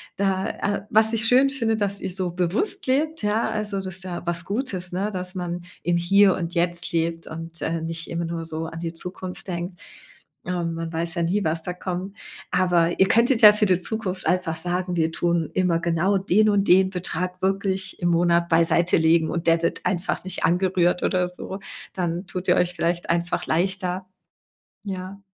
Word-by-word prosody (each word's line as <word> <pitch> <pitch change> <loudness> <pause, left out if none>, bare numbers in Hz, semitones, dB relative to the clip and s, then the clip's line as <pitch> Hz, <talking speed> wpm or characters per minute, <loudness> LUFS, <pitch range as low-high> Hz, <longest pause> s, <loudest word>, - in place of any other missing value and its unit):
Da, 195 -1 0
äh 205 0 -2
was 220 +1 +5
ich 225 -1 +1
schön 260 +4 +5
finde, 230 -5 0
dass 200 -2 -1
ihr - - -3
so 185 0 -2
bewusst 185 - 0
lebt, 300 +1 0
ja, 210 +2 +1
also 215 -2 -2
das 190 -1 -4
ist 185 0 -4
ja 180 -2 -5
was 170 0 -1
Gutes, 200 -5 -3
ne? 190 +4 -1
Dass 180 -1 -4
man 175 -2 -4 0.2
im 175 0 +1
Hier 195 +2 +4
und 170 -1 -4
Jetzt 175 0 +1
lebt 165 0 -1
und, 165 +1 -8
äh, 165 0 -1
nicht 165 0 -5
immer 170 0 -3
nur 165 0 -4
so 160 0 -4
an 165 - -8
die 165 0 -4
Zukunft 180 +2 -6
denkt. 175 0 -5 0.7
Ähm, 175 -2 -2
man 165 0 -5
weiß 165 +2 -1
ja 170 - 0
nie, 195 +5 0
was 160 +1 0
da 180 - -2
kommt, 185 +2 -5 0.4
aber 175 -2 +2
ihr 190 - +6
könntet 235 +1 +3
ja 210 -2 +11
für 210 0 +2
die 185 -3 +3
Zukunft 190 -2 -3
einfach 180 -3 +1
sagen: 180 +2 -2
„Wir 160 -1 +1
tun 170 -2 0
immer 180 -3 +2
genau 170 +4 +1
den 195 +3 +3
und 205 -1 +2
den 190 +1 +6
Betrag 180 0 -4
wirklich 190 0 -1
im 175 - +2
Monat 170 0 +3
beiseite 170 +1 +4
legen 160 0 +3
und 170 0 -3
der 165 0 +4
wird - - -1
einfach 180 0 -1
nicht 185 - -2
angerührt“ 180 0 +2
oder 180 -1 +1
so. 180 +2 -7 0.3
Dann 175 0 -3
tut 180 +1 -5
ihr - - +5
euch 180 0 +1
vielleicht 170 0 -1
einfach 170 +1 0
leichter. 185 +2 0 0.8
Ja. 190 0 -6
180 Hz, 195 wpm, -24 LUFS, 170-195 Hz, 0.8 s, ja